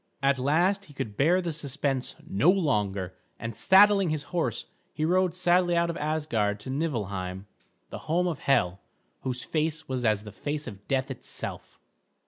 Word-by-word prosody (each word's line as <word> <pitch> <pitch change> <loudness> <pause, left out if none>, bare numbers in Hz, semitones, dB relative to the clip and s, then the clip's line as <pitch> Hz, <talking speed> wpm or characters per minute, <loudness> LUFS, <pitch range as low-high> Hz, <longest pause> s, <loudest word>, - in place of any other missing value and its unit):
At 135 -1 +3
last 175 +9 +2
he 145 - -16
could 105 -5 -4
bear 170 - +3
the 170 -2 -3
suspense 140 -3 -2
no 185 -1 +3
longer, 105 - +1 0.2
and 115 -1 -5
saddling 195 - +6
his 155 -2 -1
horse 170 -2 -1 0.3
he 155 - -2
rode 180 +1 +2
sadly 180 -1 +3
out 170 0 +2
of 170 - -7
Asgard 145 -10 0
to 130 - -6
Niflheim, 100 - -3 0.5
the - - -6
home 175 +3 +2
of 160 -5 -2
Hel, 95 -9 +2 0.4
whose 125 -2 -4
face 160 0 -2
was 130 -2 -2
as 105 -3 +2
the 105 - -9
face 150 +5 -4
of 105 -4 -10
death 135 0 0
itself. 130 - -6
145 Hz, 165 wpm, -27 LUFS, 115-170 Hz, 0.5 s, saddling